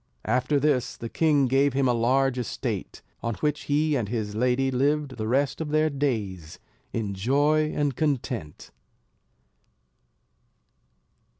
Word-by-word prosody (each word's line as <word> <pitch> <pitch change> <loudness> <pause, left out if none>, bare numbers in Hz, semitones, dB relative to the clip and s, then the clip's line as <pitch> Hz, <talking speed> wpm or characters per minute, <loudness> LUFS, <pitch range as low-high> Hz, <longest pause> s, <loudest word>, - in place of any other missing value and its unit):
After 130 +3 +1
this 135 -4 0
the 115 - -6
king 150 -2 +3
gave 135 +2 +2
him 135 0 +2
a 125 - +3
large 130 +2 +2
estate; 120 - -4 0.2
on 115 -1 -2
which 150 +6 -2
he 150 +1 +1
and 110 -7 -1
his 110 -3 -3
lady 125 +4 +1
lived 140 0 0
the 110 -1 -3
rest 135 +6 +1
of 155 - -3
their 155 +1 +2
days, 105 - -3 0.3
in 105 -3 -2
joy 145 +9 +2
and 145 -3 0
content. 125 - -3
135 Hz, 130 wpm, -26 LUFS, 115-145 Hz, 0.3 s, king